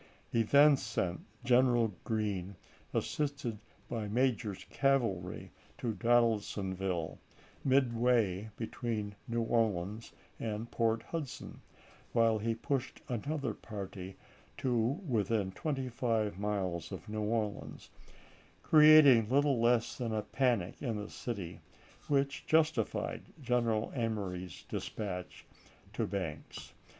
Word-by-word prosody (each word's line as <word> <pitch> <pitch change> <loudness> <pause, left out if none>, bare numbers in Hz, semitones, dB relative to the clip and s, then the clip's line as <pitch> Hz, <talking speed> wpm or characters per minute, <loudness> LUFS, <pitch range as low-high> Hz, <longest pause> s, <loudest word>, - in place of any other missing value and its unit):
He 115 - +3
then 140 +5 +6
sent 95 -8 -2
p. - - -16 0.3
210." 125 - +7
General 120 -4 +4
Green, 100 -4 -2 0.4
assisted 140 -7 -2 0.3
by 110 -3 -3
Major's 110 -4 0
cavalry, 115 -11 0 0.3
to 115 -2 -2
Don 120 +5 +4
aldsonville, 95 -6 -2 0.4
midway 120 -6 +2
between 110 -3 -3
New 115 -1 0
Orleans 110 -2 0 0.3
and 110 +1 -4
Port 115 -1 +1
Hudson, 155 -6 -6 0.5
while 115 -2 +4
he 115 +2 0
pushed 130 +2 -2
another 135 +1 -2
party 95 -3 -7 0.4
to 125 -2 0 0.3
within 105 -5 +1
twenty 135 +3 -2
five 115 -5 0
miles 95 -5 -2
of 95 -5 -7
New 110 0 -3
Orleans, 105 -1 -3 0.7
creating 150 -7 +8
little 140 -2 +3
less 120 0 +2
than 115 -3 -1
a 105 - -1
panic 120 -10 0
in 120 -5 -1
the 105 0 -5
city, 100 -8 -5 0.5
which 140 -1 0
justified 160 0 +1 0.2
General 120 -4 +1
Emory's 100 - -3
dispatch 90 -4 -5 0.5
to - - -1
Banks. 90 -6 -5
115 Hz, 110 wpm, -33 LUFS, 100-125 Hz, 0.7 s, creating